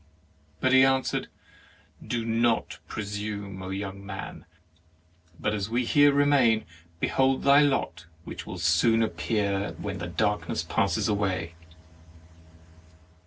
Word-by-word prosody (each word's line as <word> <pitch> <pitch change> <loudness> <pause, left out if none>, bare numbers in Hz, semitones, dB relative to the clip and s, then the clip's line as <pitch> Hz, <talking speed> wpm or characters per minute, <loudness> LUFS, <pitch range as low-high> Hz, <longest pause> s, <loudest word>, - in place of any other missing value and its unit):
But 130 0 +2
he 130 0 +7
answered: 135 0 +1 0.4
" - - -24
Do 115 -1 -2
not 115 0 0
presume, 100 -2 -5
young 100 0 -5
man; 100 -1 -8 0.9
but 105 - -1
as 105 -1 -3
we 120 +2 0
here 145 +3 +5
remain, 140 -6 +3 0.3
behold 135 +6 +1
thy 140 +1 +6
lot, 90 - 0 0.2
which - - -8
will - - -6
soon 90 +7 +3
appear 100 +1 -1
when 100 -2 -5
the 85 - -4
darkness 105 +4 -1
passes - - 0
away." 95 -5 -1
105 Hz, 120 wpm, -27 LUFS, 95-125 Hz, 0.9 s, he